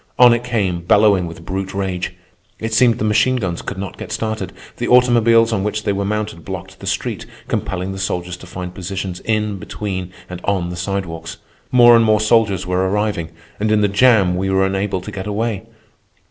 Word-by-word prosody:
On 125 Hz, -1 st, +8 dB
it 120 Hz, 0 st, -1 dB
came, 100 Hz, -8 st, -1 dB
bellowing 100 Hz, 0 st, +4 dB
with 85 Hz, 0 st, -10 dB
brute 95 Hz, +1 st, -4 dB
rage. 95 Hz, -2 st, -3 dB, 0.4 s
It 115 Hz, 0 st, -4 dB
seemed 115 Hz, 0 st, +4 dB
the -, -, -3 dB
machine 110 Hz, +5 st, +3 dB
guns 95 Hz, -8 st, -2 dB
could 100 Hz, -, -6 dB
not 95 Hz, -2 st, -6 dB
get -, -, -7 dB
started. 110 Hz, -4 st, -3 dB, 0.3 s
The 120 Hz, -, -2 dB
automobiles 115 Hz, -2 st, +5 dB
on 95 Hz, -3 st, 0 dB
which 105 Hz, +1 st, -2 dB
they 100 Hz, -, 0 dB
were 100 Hz, +1 st, -1 dB
mounted 105 Hz, -4 st, -3 dB
blocked 95 Hz, +1 st, -7 dB
the -, -, -8 dB
street, -, -, -3 dB, 0.2 s
compelling 95 Hz, +1 st, -2 dB
the 95 Hz, -, -6 dB
soldiers 90 Hz, -1 st, -2 dB
to 95 Hz, -, -13 dB
find 90 Hz, 0 st, -6 dB
positions 95 Hz, 0 st, -5 dB
in, 105 Hz, -2 st, -1 dB
between, 95 Hz, -2 st, -5 dB, 0.2 s
and 90 Hz, -1 st, -8 dB
on 95 Hz, -3 st, 0 dB
the 90 Hz, -, -5 dB
sidewalks. 90 Hz, -3 st, -4 dB, 0.3 s
More 120 Hz, -1 st, +7 dB
and 115 Hz, -, +5 dB
more 110 Hz, -1 st, +3 dB
soldiers 110 Hz, -4 st, +2 dB
were 90 Hz, +1 st, 0 dB
arriving, 105 Hz, -5 st, -1 dB, 0.3 s
and 105 Hz, +1 st, 0 dB
in 105 Hz, -1 st, +3 dB
the 105 Hz, -, +4 dB
jam 100 Hz, -3 st, +4 dB
we 95 Hz, +1 st, -1 dB
were 95 Hz, 0 st, +3 dB
unable 95 Hz, -1 st, -1 dB
to 105 Hz, -, -8 dB
get 100 Hz, -1 st, -6 dB
away. 110 Hz, 0 st, -2 dB
100 Hz, 200 wpm, -19 LUFS, 95-110 Hz, 0.4 s, On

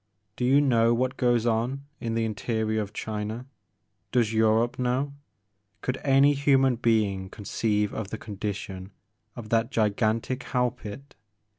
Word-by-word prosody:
Do 125 Hz, -, -1 dB
you 135 Hz, +3 st, +5 dB
know 120 Hz, -4 st, +3 dB
what 130 Hz, +2 st, 0 dB
goes 120 Hz, -3 st, +2 dB
on 120 Hz, +4 st, 0 dB
in 115 Hz, -1 st, -3 dB
the 115 Hz, 0 st, +1 dB
interior 110 Hz, 0 st, -1 dB
of 105 Hz, -1 st, -5 dB
China? 110 Hz, +3 st, -4 dB, 0.7 s
Does 115 Hz, -3 st, +2 dB
Europe 110 Hz, +2 st, +2 dB
know, 130 Hz, +3 st, 0 dB, 0.3 s
— 100 Hz, 0 st, -47 dB
could 130 Hz, 0 st, -1 dB
any 140 Hz, +1 st, +5 dB
human 135 Hz, -3 st, +3 dB
being 105 Hz, -5 st, +1 dB
conceive 105 Hz, 0 st, -1 dB
of 110 Hz, -3 st, -4 dB
the 110 Hz, -, -4 dB
condition 100 Hz, -2 st, -6 dB, 0.4 s
of 110 Hz, -3 st, -8 dB
that 115 Hz, +1 st, +2 dB
gigantic 110 Hz, +2 st, 0 dB
hell 125 Hz, -3 st, 0 dB
pit? 120 Hz, +3 st, -10 dB
115 Hz, 145 wpm, -27 LUFS, 105-125 Hz, 0.7 s, you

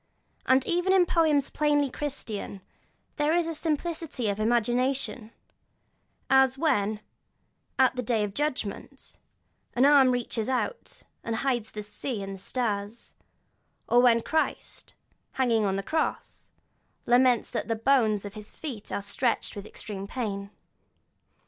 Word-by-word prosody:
And 260 Hz, 0 st, +4 dB
even 355 Hz, +2 st, +1 dB
in 370 Hz, -2 st, +5 dB
poems 310 Hz, -5 st, +2 dB
plainly 290 Hz, -2 st, +1 dB
Christian 225 Hz, -10 st, -5 dB, 0.6 s
there 300 Hz, +2 st, +2 dB
is 345 Hz, -1 st, +2 dB
a -, -, -3 dB
fine 315 Hz, -1 st, 0 dB
simplicity 315 Hz, -8 st, -3 dB
of 200 Hz, +1 st, -2 dB
imagination; 240 Hz, +1 st, 0 dB, 1.0 s
as 265 Hz, -1 st, +4 dB
when, 215 Hz, -8 st, +1 dB, 0.8 s
at 260 Hz, -1 st, +4 dB
the 250 Hz, -, -1 dB
day 225 Hz, -2 st, 0 dB
of 205 Hz, -1 st, -3 dB
judgment, 275 Hz, -8 st, -4 dB, 0.6 s
an 250 Hz, +3 st, +4 dB
arm 280 Hz, -2 st, +6 dB
reaches 245 Hz, -2 st, -1 dB
out, 265 Hz, -, -3 dB, 0.2 s
and 230 Hz, -, -2 dB
hides 240 Hz, -3 st, -1 dB
the 210 Hz, -, -6 dB
sea 210 Hz, +1 st, -5 dB
and 195 Hz, 0 st, -6 dB
the 195 Hz, -, -9 dB
stars; 210 Hz, 0 st, -3 dB, 0.7 s
or 240 Hz, -, +4 dB
when 235 Hz, -2 st, +4 dB
Christ, 315 Hz, 0 st, -2 dB, 0.4 s
hanging 235 Hz, -5 st, +2 dB
on 195 Hz, -1 st, 0 dB
the 195 Hz, -, -2 dB
cross, 315 Hz, +9 st, -3 dB, 0.6 s
laments 245 Hz, -1 st, +3 dB
that -, -, -3 dB
the 225 Hz, -, 0 dB
bones 220 Hz, -4 st, +2 dB
of 200 Hz, -, -7 dB
his 215 Hz, 0 st, -11 dB
feet 255 Hz, -10 st, -7 dB
are 200 Hz, -, -2 dB
stretched 235 Hz, +3 st, -1 dB
with 200 Hz, 0 st, -7 dB
extreme 200 Hz, -3 st, -7 dB
pain. 200 Hz, -5 st, -4 dB
245 Hz, 140 wpm, -27 LUFS, 215-280 Hz, 1.0 s, arm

